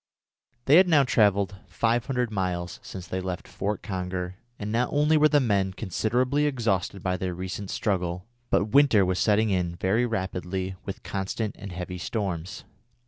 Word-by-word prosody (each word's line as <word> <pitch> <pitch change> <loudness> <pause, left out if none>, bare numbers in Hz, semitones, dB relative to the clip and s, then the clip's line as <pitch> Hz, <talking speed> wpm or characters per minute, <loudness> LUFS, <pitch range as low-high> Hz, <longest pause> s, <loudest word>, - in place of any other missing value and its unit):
They 145 +4 +7
had 185 +1 +7
now 150 -4 +6
travelled 100 -5 +2
500 120 +5 0
miles 90 -3 -2
since 95 -2 -8
they 95 +1 -3
left 90 -1 -5
Fort 105 0 -3
Conger, 90 -2 -3 0.2
and 105 0 -4
not 120 +2 +1
only 150 +2 +3
were 155 0 +5
the 145 0 +4
men 100 -7 +1
considerably 125 - 0
exhausted 105 -8 -1
by 90 -1 0
their 90 -1 -3
recent 95 +2 -5
struggle, 90 -5 -1 0.2
but 100 - +3
winter 135 -9 +6
was 90 0 0
setting 110 0 +3
in 90 -2 0
very 105 +8 +1
rapidly 95 -3 -3
with 95 - -6
constant 100 +2 -3
and 100 -2 -7
heavy 90 +1 -5
storms. 95 -3 -3
100 Hz, 160 wpm, -26 LUFS, 90-115 Hz, 0.2 s, They